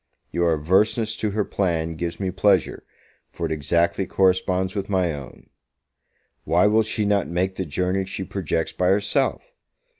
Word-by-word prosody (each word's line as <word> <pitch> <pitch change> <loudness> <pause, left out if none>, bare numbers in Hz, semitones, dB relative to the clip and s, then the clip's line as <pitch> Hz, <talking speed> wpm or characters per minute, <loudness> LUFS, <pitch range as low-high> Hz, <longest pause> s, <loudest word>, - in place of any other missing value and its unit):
Your 85 -1 +2
averseness 105 +8 +1
to 110 - -1
her 105 0 -1
plan 85 -4 -1
gives 85 +1 -4
me 95 -2 -1
pleasure, 95 -2 +1 0.5
for - - -5
it - - -3
exactly 85 +4 0
corresponds 95 0 +1
with 100 -1 -4
my 90 -4 +1
own. 70 -3 -11 0.9
Why 85 +5 +3
will 110 +2 +4
she 110 0 -1
not 100 -2 +1
make 95 +2 -1
the 95 - -3
journey 90 +5 -1
she 95 0 -5
projects 85 -4 -2
by 90 - 0
herself? 105 +8 +1
95 Hz, 155 wpm, -23 LUFS, 85-100 Hz, 0.9 s, will